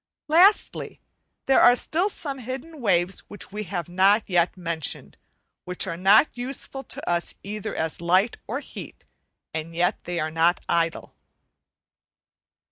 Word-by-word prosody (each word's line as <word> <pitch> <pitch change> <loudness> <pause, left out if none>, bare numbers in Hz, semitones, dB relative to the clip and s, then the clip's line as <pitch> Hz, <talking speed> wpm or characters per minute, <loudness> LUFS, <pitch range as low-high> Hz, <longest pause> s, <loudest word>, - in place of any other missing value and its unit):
Lastly, 360 +7 +3 0.5
there 270 - +4
are 245 - +7
still 345 +10 0
some 280 -8 -4
hidden 265 +5 -7
waves 180 -3 +1
which 205 - -9
we 210 +1 -5
have 180 -2 -4
not 195 +4 +3
yet 175 -1 +1
mentioned, 170 -4 -4 0.5
which 180 0 -2
are 175 -3 -4
not 195 - +5
useful 270 +2 -5
to - - -4
us 175 0 0
either 210 +1 -5
as 160 +1 -3
light 185 +6 +2
or 245 +6 -3
heat, - - -10 0.5
and 160 +1 -5
yet 180 +4 0
they 175 -1 -3
are 155 0 -2
not 165 +2 +2
idle. 165 -1 -1
195 Hz, 140 wpm, -24 LUFS, 170-250 Hz, 0.5 s, are